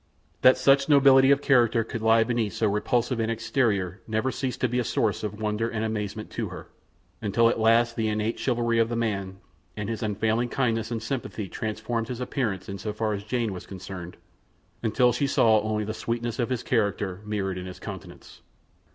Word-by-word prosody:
That 130 - +7
such 135 +2 +4
nobility 135 -2 +6
of 140 0 +4
character 120 -3 +4
could 115 0 -6
lie 115 0 +5
beneath 115 -3 -1
so 110 - +1
repulsive 115 +4 0
an 110 0 0
exterior 110 - 0
never 110 +4 0
ceased 130 -1 -3
to 125 - +3
be 125 +1 -1
a - - +1
source 110 -2 0
of 105 0 -5
wonder 110 +1 -1
and 110 -1 -2
amazement 105 -1 -4
to - - -3
her, - - -10 0.5
until 115 +2 +3
at 115 - -1
last 115 +1 +3
the 110 -1 0
innate 110 +1 -1
chivalry 120 -2 +1
of 115 0 +2
the 120 - -2
man, 100 -5 -2 0.4
and 105 0 -3
his 115 -2 -3
unfailing 110 +3 0
kindliness 115 -4 0
and 115 -2 -3
sympathy 115 -4 -4
transformed 110 +3 -3
his 125 -1 -5
appearance 115 -7 -2
in 100 0 -6
so 105 +3 -4
far 110 0 -1
as 100 0 -4
Jane 115 -1 -1
was 90 - -8
concerned 95 -2 -8 0.6
until 120 +2 +3
she 140 +4 0
saw 110 -4 +4
only 105 0 -1
the 110 +1 -4
sweetness 115 +2 -3
of 120 - 0
his 125 -3 -2
character 100 -4 -1
mirrored 100 -3 -2
in 90 - -7
his 90 - -8
countenance. - - -10
115 Hz, 195 wpm, -26 LUFS, 105-120 Hz, 0.6 s, That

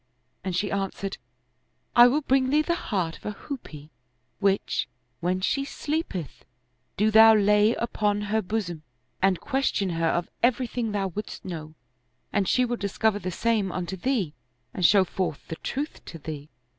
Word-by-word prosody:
" 125 - -46
and 185 -2 -2
she 200 +3 0
answered, 195 0 -3 0.4
" - - -47 0.3
I 240 0 +10
will 285 +5 +2
bring 265 -2 +2
thee 300 +3 +3
the 340 - +1
heart 185 - -2
of - - -21
a - - -1
hoopoe, 160 - -8 0.5
which, 195 -1 +1 0.3
when 185 +2 0
she 275 +8 +1
sleepeth, 290 - -4 0.5
do 215 +2 +3
thou 220 +1 +9
lay 210 +2 +4
upon 210 -3 0
her 210 +1 0
bosom 180 -6 -3 0.4
and 190 -2 +3
question 265 -8 0
her 165 0 0
of 170 +1 0
everything 240 -2 +1
thou 195 -2 -1
wouldst 205 +3 -7
know, 155 -4 -6 0.6
and 200 -2 +1
she 255 - +3
will 240 0 -2
discover 205 +1 0
the 185 - -3
same 210 0 0
unto 180 +1 -3
thee 195 - -1 0.4
and 180 -3 +4
show 200 -2 +5
fortii 180 -4 -3
the 160 - -3
truth 290 +4 -4
to 165 - -8
thee." 150 -1 -7
205 Hz, 170 wpm, -26 LUFS, 180-235 Hz, 0.6 s, I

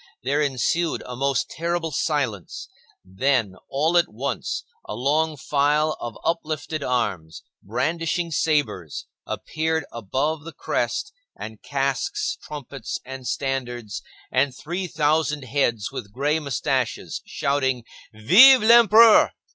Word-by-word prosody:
There 140 +4 +1
ensued 150 +4 0
a 125 - -6
most 135 0 0
terrible 170 0 -2
silence; 130 - -2 0.4
then, 110 +2 0 0.2
all 155 +5 +1
at 170 - 0
once, 130 +6 -3 0.2
a - - -5
long 150 +5 +1
file 150 +3 +1
of 120 - -6
uplifted 155 -2 -2
arms, 105 -11 -2 0.2
brandishing 165 - -1
sabres, 140 - -1 0.2
appeared 160 -1 -2
above 135 +8 -2
the 165 - -9
crest, 425 0 -2 0.3
and 110 -1 -8
casques, 145 - -1
trumpets, 140 -5 -6
and 130 -1 -7
standards, 125 -4 -3 0.3
and 130 0 +1
three 175 +6 -4
thousand 150 -2 +1
heads 120 -5 0
with 100 - -7
gray 145 +7 0
moustaches, 140 -5 -2
shouting, 130 -3 0 0.3
"Vive 215 - +7
l'Empereur!" 230 -1 +7
140 Hz, 115 wpm, -23 LUFS, 125-160 Hz, 0.4 s, Vive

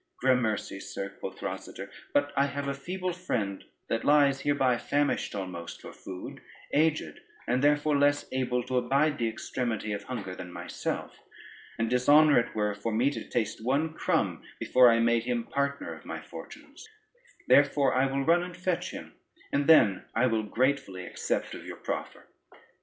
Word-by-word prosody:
"Gramercy, 120 -6 +1
sir," 100 0 -5
quoth - - -7
Rosader, - - -6 0.2
"but 145 0 +1
I 140 +1 +3
have 140 0 -4
a 140 - 0
feeble 180 +6 -4
friend 110 - -3 0.2
that 115 - -1
lies 140 -2 +4
hereby 135 -4 +2
famished 145 -5 0
almost 90 -4 -6
for - - -10
food, 90 -1 -9 0.3
aged 155 +1 +1 0.3
and 125 +3 +1
therefore 150 +1 +3
less 145 0 +3
able 125 -1 0
to 125 +1 0
abide 140 +4 +1
the 115 - +1
extremity 110 -1 -3
of 100 0 -5
hunger 105 -8 -5
than 90 -1 -8
myself, - - -5 0.6
and 115 - 0
dishonor 145 +4 +5
it 120 - -3
were 105 -1 0
for 105 +3 -4
me 120 +6 +2
to - - -5
taste 110 -1 -2
one 145 +6 +1
crumb, - - 0 0.2
before 125 -1 +6
I 115 0 +4
made 115 0 +2
him 120 -1 -1
partner 140 +3 -2
of - - -12
my - - -6
fortunes: - - -11 0.6
therefore 140 -1 +4
I 130 +1 +3
will 135 0 -1
run 170 +1 +4
and 180 0 -7
fetch 185 -1 -1
him, - - -9 0.4
and 140 0 +1
then 110 - +5
I 115 +3 +3
will 115 -3 +1
gratefully 110 -4 -1
accept - - -2
of - - -8
your - - -8
proffer." - - -5
130 Hz, 170 wpm, -29 LUFS, 115-145 Hz, 0.6 s, before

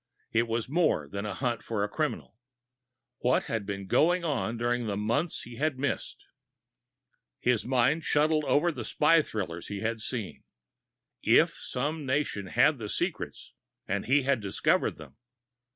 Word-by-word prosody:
It 115 +1 +2
was 115 0 -1
more 145 - +1
than 100 +7 -4
a 100 - -4
hunt 120 -3 -1
for 110 -3 -2
a - - +1
criminal. 150 -1 -3 0.8
What 125 +1 +2
had 110 -4 -3
been 100 -1 -4
going 170 - +3
on 135 -7 -1
during 120 0 0
the 100 -1 -2
months 120 +11 -1
he 120 -1 -10
had 150 -1 0
missed? 140 0 -3 1.1
His 125 -3 +1
mind 130 +5 +2
shuttled 155 +1 +2
over 160 +5 +3
the - - -6
spy 165 +2 +4
thrillers 90 - -5
he 100 -1 -5
had 115 0 -2
seen. 110 -4 -4 0.8
If - - +5
some 150 +5 -3
nation 130 -7 -1
had 135 +8 +3
the 105 -2 -5
secrets, - - -3 0.3
and 100 +1 -2
he 135 +2 +4
had 135 -1 +2
discovered 100 -2 +1
them.... - - -13
120 Hz, 155 wpm, -29 LUFS, 105-145 Hz, 1.1 s, If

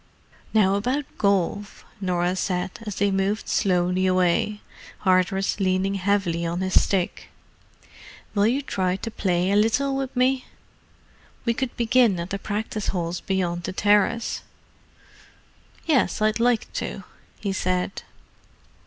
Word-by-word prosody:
"Now 200 -3 +4
about 250 +8 0
golf," 200 0 0
Norah 180 -1 0
said, 180 -1 -1 0.2
as 205 - -3
they 200 0 +1
moved 195 +2 0
slowly 180 -1 +1
away, 185 +3 +1 0.4
Hardress 190 +2 +2
leaning 190 0 +1
heavily 190 -3 0
on 170 +2 -2
his 185 0 +4
stick. 185 -3 -2 1.0
"Will 205 0 +3
you 265 +5 +1
try 185 -7 -1
to 225 +4 -5
play 180 -2 0
a - - +3
little 250 +6 +2
with 270 -1 -3
me? 255 +1 +2 1.0
We 235 - +2
could 260 +1 -3
begin 235 -5 +3
at 170 +2 -5
the 195 - -2
practice 215 +1 -3
holes 175 -1 -2
beyond 180 -3 -1
the 175 - -5
terrace." 210 +4 +2 1.4
"Yes, 290 -8 +2
I'd 215 +1 +1
like 240 -1 +1
to," - - -4 0.4
he 200 -2 -2
said. 185 0 -1
195 Hz, 130 wpm, -24 LUFS, 185-220 Hz, 1.4 s, Now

